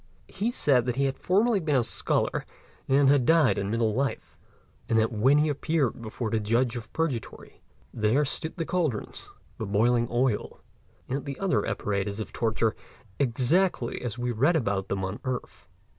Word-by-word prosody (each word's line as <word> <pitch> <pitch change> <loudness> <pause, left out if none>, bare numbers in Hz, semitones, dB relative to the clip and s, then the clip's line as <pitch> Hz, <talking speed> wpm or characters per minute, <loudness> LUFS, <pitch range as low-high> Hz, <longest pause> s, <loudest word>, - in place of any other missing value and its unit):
He 200 +4 0
said 125 - +2
he 140 +1 +1
had 135 0 -2
formerly 210 +4 +2
been 155 -5 0
a 125 - +3
scholar, - - -1 0.4
and 135 +1 +4
had 140 -1 +5
died 150 -8 +4
in 100 0 -2
middle 115 -1 +1
life; 135 +4 -2 0.5
and 115 - +3
that 110 +2 +2
when 125 +6 +4
he 150 +1 +3
appeared 145 -3 0
before 110 0 -4
the 110 - +1
Judge 115 +3 +1
of 120 -1 -7
Purgatory, 150 -9 -4 0.3
there 115 +7 +2
stood 160 +3 -3
the 165 - -2
cauldrons, 160 - -2 0.3
the 110 - -3
boiling 120 +4 +2
oil, 120 -2 -1 0.5
and 140 +1 -4
other 195 -2 0
apparatus 100 0 -2
of 110 - -6
torture, 115 -1 0 0.4
exactly 135 +2 +1
as 120 -1 -4
we 120 0 -1
read 135 +9 +2
about 100 -9 0
them 95 -1 -2
on 95 +2 -5
earth. 130 -2 -5
125 Hz, 165 wpm, -27 LUFS, 110-145 Hz, 0.5 s, had